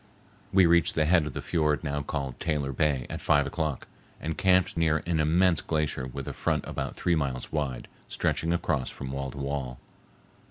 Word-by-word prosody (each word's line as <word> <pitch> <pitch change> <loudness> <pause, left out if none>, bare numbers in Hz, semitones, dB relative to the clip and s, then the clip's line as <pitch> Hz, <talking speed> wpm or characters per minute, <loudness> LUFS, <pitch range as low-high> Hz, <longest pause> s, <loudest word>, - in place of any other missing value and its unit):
We 95 -1 +6
reached 85 -2 +4
the 80 - +3
head 85 -1 +4
of 75 - -6
the - - -5
fiord 75 -3 +1
now 75 -1 -1
called 70 -3 -4
Taylor 75 -4 -1
Bay 70 -2 +1
at - - -6
five 70 -2 +3
o'clock 80 -4 -3 0.3
and 80 0 -3
camped 95 -2 +3
near 80 -2 +2
an 85 -2 0
immense 85 +2 +3
glacier 75 -5 -1
with 65 +1 -7
a - - -3
front - - -1
about - - -4
three 90 - +1
miles 70 -5 -2
wide 70 -6 -2 0.2
stretching 80 - 0
across 80 -6 0
from 65 -1 -7
wall 70 0 -3
to 65 - -10
wall. 70 -3 -3
75 Hz, 190 wpm, -28 LUFS, 70-80 Hz, 0.3 s, We